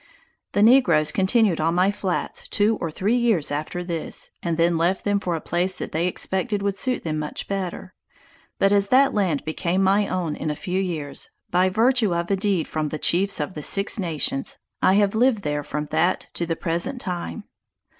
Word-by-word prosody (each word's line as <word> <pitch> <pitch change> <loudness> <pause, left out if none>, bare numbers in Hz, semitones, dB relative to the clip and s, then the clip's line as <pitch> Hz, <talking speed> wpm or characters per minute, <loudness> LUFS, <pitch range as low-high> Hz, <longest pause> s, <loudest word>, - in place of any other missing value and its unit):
The 205 - +3
negroes 225 - +5
continued 195 -3 +2
on 165 +2 +1
my 185 +3 +3
flats 190 -3 -3
two 210 +2 +2
or 165 - -1
three 200 +9 0
years 225 -12 +2
after 155 +4 -3
this, 170 -2 -1
and 170 -2 -2
then 170 0 +3
left 175 +3 0
them 205 -1 +2
for 180 -3 -2
a - - -3
place 180 +4 -1
that - - -5
they 165 +3 0
expected 190 +3 -1
would 200 -1 0
suit 255 +5 -2
them 155 -2 -2
much 150 -1 -4
better. 190 -1 -4 0.6
But 195 - +3
as 200 -1 +3
that 270 +5 +4
land 185 -9 0
became 170 +4 -1
my 200 +2 +3
own 170 -5 -2
in - - -4
a 150 - -2
few 185 +5 -2
years, 155 -7 -4 0.2
by 180 +1 +3
virtue 225 -1 +2
of 170 +2 -2
a - - +4
deed 195 -4 0
from 155 -1 -2
the 155 - -4
Chiefs 190 +6 +1
of 150 +5 -3
the 150 - -6
Six 200 +7 +1
Nations, 155 -6 -2 0.2
I 190 - +4
have 200 -1 +3
lived 225 -2 +2
there 150 0 -2
from 150 +1 -4
that 175 +3 +1
to 170 - -3
the 165 - -1
present 170 +10 -2
time. 180 +1 -5
185 Hz, 200 wpm, -23 LUFS, 165-200 Hz, 0.6 s, negroes